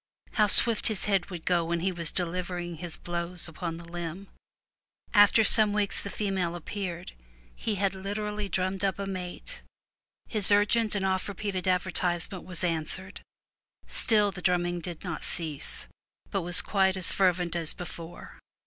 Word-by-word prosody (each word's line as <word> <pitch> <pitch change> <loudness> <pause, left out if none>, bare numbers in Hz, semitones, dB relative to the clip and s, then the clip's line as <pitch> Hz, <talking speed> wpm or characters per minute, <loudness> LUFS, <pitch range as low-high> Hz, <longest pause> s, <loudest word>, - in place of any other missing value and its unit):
How 210 -1 +2
swift 225 +2 +6
his 215 -3 +1
head 195 -3 0
would 175 -4 -8
go 175 -2 +2
when 170 0 -2
he 190 +2 0
was 170 -3 -3
delivering 175 -1 -3
his 175 0 -5
blows 175 0 -4
upon 165 0 -6
the 170 - -10
limb! 175 +3 -7 0.8
After 205 +1 +6
some 215 0 +4
weeks 205 -1 -1
the 200 - -6
female 190 -5 -2
appeared; 180 0 -6 0.4
he 210 - -3
had 195 0 0
literally 205 +1 -4
drummed 185 +1 -2
up 195 -2 0
a 200 - -4
mate; 185 - -6 0.7
his 210 -3 +10
urgent 210 +2 +2
and 195 -1 -1
oft 190 -1 -1
repeated 195 -2 -4
advertisement 180 -1 0
was 180 -1 -7
answered. 175 +3 -2 0.6
Still 210 -3 +2
the 185 -2 -9
drumming 175 -1 0
did 170 -1 -8
not 175 -4 -5
cease, 155 -5 -5 0.4
but 195 - -1
was 175 0 +5
quite 190 -2 +1
as 185 - +2
fervent 180 -2 +1
as 165 -2 +2
before. 170 -1 -9
185 Hz, 160 wpm, -27 LUFS, 175-200 Hz, 0.8 s, his